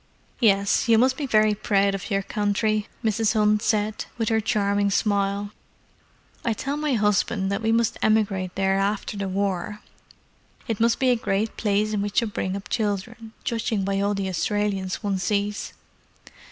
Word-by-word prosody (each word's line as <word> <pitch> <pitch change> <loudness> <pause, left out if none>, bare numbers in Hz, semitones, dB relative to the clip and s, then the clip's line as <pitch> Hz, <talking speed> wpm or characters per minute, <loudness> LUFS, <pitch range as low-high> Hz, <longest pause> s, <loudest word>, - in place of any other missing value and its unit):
"Yes, 200 -4 +3
you 225 - +6
must 255 +3 +3
be 285 -1 -3
very 215 -3 +4
proud 200 -1 +1
of 195 +1 -5
your 195 -1 0
country," 210 +1 0 0.2
Mrs. 220 0 +2
Hunt 210 0 +3
said, 215 -1 0
with 225 -2 0
her 220 -1 +2
charming 200 -1 +1
smile. 200 0 0 0.9
"I 230 - +1
tell 275 +6 -3
my 300 -1 -1
husband 210 -2 +1
that 200 - -1
we 225 0 +1
must 230 0 +1
emigrate 200 -4 +1
there 195 0 +1
after 200 +1 -1
the 200 -1 -3
war. 200 +1 -2 0.9
It 225 -3 -2
must 230 0 +3
be 260 -1 +3
a - - +4
great 215 -1 -1
place 210 0 0
in 205 - 0
which 205 0 -4
to 235 - +4
bring 195 -3 -3
up 200 +1 -6
children, 220 +2 -3
judging 225 -3 -1
by 195 0 0
all 205 +1 +1
the 195 -1 -2
Australians 195 +1 -1
one 200 -2 -1
sees." 205 +2 -1
205 Hz, 170 wpm, -24 LUFS, 200-220 Hz, 0.9 s, you